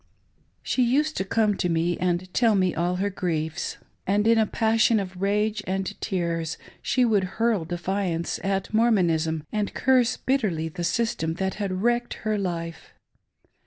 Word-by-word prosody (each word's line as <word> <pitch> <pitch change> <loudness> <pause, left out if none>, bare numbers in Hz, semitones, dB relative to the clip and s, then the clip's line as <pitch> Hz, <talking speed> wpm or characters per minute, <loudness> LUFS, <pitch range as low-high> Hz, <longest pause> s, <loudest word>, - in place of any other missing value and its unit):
She 255 - 0
used 295 +6 +2
to - - +1
come 210 +1 +1
to 180 - 0
me 170 +1 +1
and 180 0 -1
tell 230 -4 +4
me 185 -2 +2
all 175 +1 0
her 200 +2 -1
griefs; 160 -4 -2 0.3
and 205 +2 +2
in 230 0 +5
a 220 - +3
passion 225 0 +3
of 185 -2 -6
rage 210 +1 +1
and 190 0 -2
tears 170 -4 -2 0.2
she 255 -1 +2
would 210 -4 +3
hurl 225 -6 +1
defiance 175 0 -2
at 195 +2 -1
Mor 230 +2 +4
monism 160 -6 +1
and 210 -1 -2
curse 255 -2 +3
bitterly 195 -12 0
the 175 +2 -5
system 170 -5 0
that 190 +1 -1
had 190 -1 -2
wrecked 240 0 +1
her 215 -1 +1
life. 170 -3 -5
195 Hz, 160 wpm, -25 LUFS, 175-220 Hz, 0.3 s, in